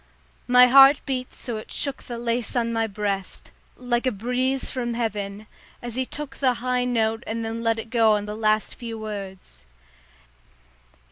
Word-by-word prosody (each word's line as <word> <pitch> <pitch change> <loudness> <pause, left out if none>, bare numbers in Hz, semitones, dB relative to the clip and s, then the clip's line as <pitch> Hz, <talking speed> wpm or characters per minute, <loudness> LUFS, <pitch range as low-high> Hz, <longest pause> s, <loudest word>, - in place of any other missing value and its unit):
My 250 0 +8
heart 270 +3 +8
beat 255 -2 -3
so 240 -4 -6
it 215 - -9
shook 280 -2 -1
the 240 - -7
lace 235 +1 -1
on 230 -1 0
my 225 0 0
breast, 200 -2 -4 0.3
like 245 0 -1
a - - +2
breeze 250 +5 -1
from 240 -2 -3
heaven, 210 -3 -3 0.3
as 240 -1 -6
he 260 +1 -2
took 295 -2 -8
the 255 -3 +2
high 250 +1 -1
note 225 -2 0
and 225 +1 -3
then 225 +1 -4
let 230 -1 +1
it 225 0 -7
go 225 -3 +4
on 205 -1 -1
the 210 - -5
last 215 -1 +1
few 230 -2 -7
words. 200 -3 -8
230 Hz, 175 wpm, -24 LUFS, 220-250 Hz, 0.3 s, My